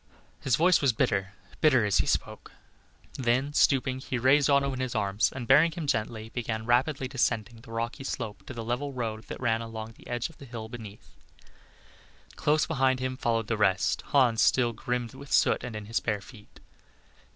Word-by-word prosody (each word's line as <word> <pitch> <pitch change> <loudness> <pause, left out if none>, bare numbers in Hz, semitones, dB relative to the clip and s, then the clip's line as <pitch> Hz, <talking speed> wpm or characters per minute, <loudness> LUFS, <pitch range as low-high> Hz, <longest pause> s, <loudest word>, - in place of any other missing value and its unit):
His 130 -4 +1
voice 175 +5 +4
was 135 -4 +3
bitter, 100 -3 0 0.3
bitter, 130 -8 +4
as 100 - +2
he - - +1
spoke; - - -2 0.7
then 130 +3 +1
stooping, 130 -2 +2
he 130 -1 -3
raised 135 +4 +4
Otto 140 -1 +3
in 130 - -5
his 130 -1 -3
arms, 100 +1 +1
and 130 -2 -6
bearing 160 +7 +5
him 165 -2 -5
gently, 110 -3 -2
began 110 -2 -4
rapidly 130 +3 +1
descending 120 -3 -1
the 115 - -14
rocky 115 +4 -3
slope 115 -5 -5
to - - -6
the 115 - -5
level 125 +5 -3
road 110 -3 -4
that - - -7
ran 115 -2 +1
along 115 -1 -7
the - - -16
edge 120 -1 -2
of 165 - -19
the 140 - -10
hill 115 -3 -7
beneath. 110 -4 -10 1.2
Close 150 +1 +2
behind 130 -4 +1
him 130 0 -2
followed 115 -3 0
the 110 +1 -2
rest; 100 -3 +2
Hans 125 -5 +3
still 120 -2 +3
grimed 120 +2 -3
with 140 +1 -12
soot - - +3
and 120 -3 -6
in 105 -1 -6
his 115 +3 -1
bare 105 -3 -1
feet. 105 0 -15
120 Hz, 190 wpm, -28 LUFS, 110-135 Hz, 1.2 s, bearing